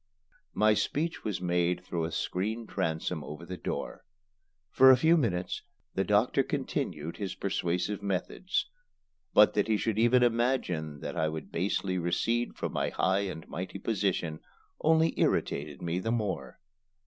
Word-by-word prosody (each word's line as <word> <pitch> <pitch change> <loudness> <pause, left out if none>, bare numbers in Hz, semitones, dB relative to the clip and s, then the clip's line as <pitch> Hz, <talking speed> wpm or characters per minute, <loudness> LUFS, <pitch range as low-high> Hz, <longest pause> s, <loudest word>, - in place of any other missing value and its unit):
My 110 0 +5
speech 160 +9 -1
was 105 -4 -2
made 90 0 +1
through 85 -3 -2
a 80 - -4
screen 110 +8 -2
transom 80 -4 -2
over 75 +3 -8
the 90 +2 -5
door. 90 - -5 0.7
For 130 0 +7
a 130 - +8
few 160 +6 +5
minutes 95 - 0 0.3
the - - +1
doctor - - +3
continued 75 +2 -3
his 100 -2 -4
persuasive 90 +1 -1
methods, 100 - -1 0.7
but 105 - +7
that 105 0 +1
he 110 -1 +2
should 110 0 -1
even 120 +2 +5
imagine 115 - 0
that - - -5
I 80 - +1
would 80 0 -6
basely 95 +1 0
recede 115 +8 0
from - - -4
my - - 0
high 95 +2 +1
and 80 -3 -8
mighty 90 +5 -5
position 95 -7 -1 0.4
only 160 +1 +3
irritated 75 0 0
me 85 +1 -1
the 110 - -3
more. 95 - -2
95 Hz, 150 wpm, -30 LUFS, 85-115 Hz, 0.7 s, a